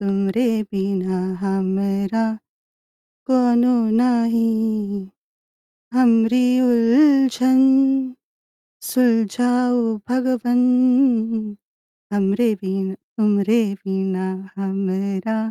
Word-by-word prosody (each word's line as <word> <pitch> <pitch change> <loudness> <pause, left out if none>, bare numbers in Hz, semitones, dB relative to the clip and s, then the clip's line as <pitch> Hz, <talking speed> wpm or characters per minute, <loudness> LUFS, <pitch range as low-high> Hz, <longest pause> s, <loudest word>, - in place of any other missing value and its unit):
तुमरे 200 +4 -1 0.3
बिना 190 -1 -2 0.2
हमरा 195 +3 -1 1.0
कोनो 245 -1 +3 0.2
नाही 230 -2 +1 1.5
हमरी 245 0 +3 0.2
उलझन 260 +1 +3 1.3
सुलझाऊ 245 +1 +1 0.3
भगवन 250 -1 0 1.5
हमरे 205 +3 +1
बिना 190 0 -3 0.2
तूमरे 210 +2 +2 0.2
बिना 190 -1 -3 0.3
हमरा 195 +2 -3
225 Hz, 55 wpm, -20 LUFS, 195-245 Hz, 1.5 s, कोनो